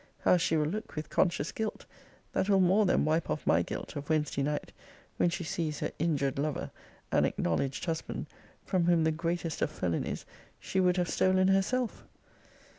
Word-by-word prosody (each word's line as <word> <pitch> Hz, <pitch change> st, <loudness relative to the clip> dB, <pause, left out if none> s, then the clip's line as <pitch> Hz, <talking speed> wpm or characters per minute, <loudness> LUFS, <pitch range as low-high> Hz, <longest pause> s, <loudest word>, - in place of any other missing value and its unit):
How -, -, +5 dB
she 165 Hz, -1 st, +1 dB
will 150 Hz, -, +2 dB
look 210 Hz, +8 st, -4 dB
with 155 Hz, 0 st, -5 dB
conscious 170 Hz, -5 st, +1 dB
guilt, 220 Hz, -1 st, -4 dB, 0.5 s
that 195 Hz, -, 0 dB
will 195 Hz, -1 st, +5 dB
more 190 Hz, +3 st, +4 dB
than 175 Hz, -, +3 dB
wipe 160 Hz, +1 st, +1 dB
off 150 Hz, -, -2 dB
my -, -, +4 dB
guilt -, -, -5 dB
of 145 Hz, 0 st, -6 dB
Wednesday 150 Hz, -3 st, +1 dB
night, 145 Hz, +1 st, -2 dB, 0.5 s
when 175 Hz, -, +3 dB
she 175 Hz, -, -3 dB
sees 160 Hz, -2 st, -2 dB
her -, -, -1 dB
injured 140 Hz, -5 st, 0 dB
lover, 150 Hz, 0 st, -2 dB, 0.4 s
and -, -, +4 dB
acknowledged 130 Hz, -, 0 dB
husband, 165 Hz, -2 st, -3 dB, 0.4 s
from 185 Hz, -3 st, +1 dB
whom, 170 Hz, -2 st, +4 dB
the 160 Hz, -, +3 dB
greatest 165 Hz, 0 st, -2 dB
of -, -, +2 dB
felonies, 90 Hz, -, -2 dB, 0.3 s
she 190 Hz, -, -2 dB
would 180 Hz, 0 st, +3 dB
have 175 Hz, -1 st, +1 dB
stolen 185 Hz, +1 st, +3 dB
herself. 220 Hz, +6 st, +1 dB
165 Hz, 180 wpm, -30 LUFS, 150-185 Hz, 0.5 s, How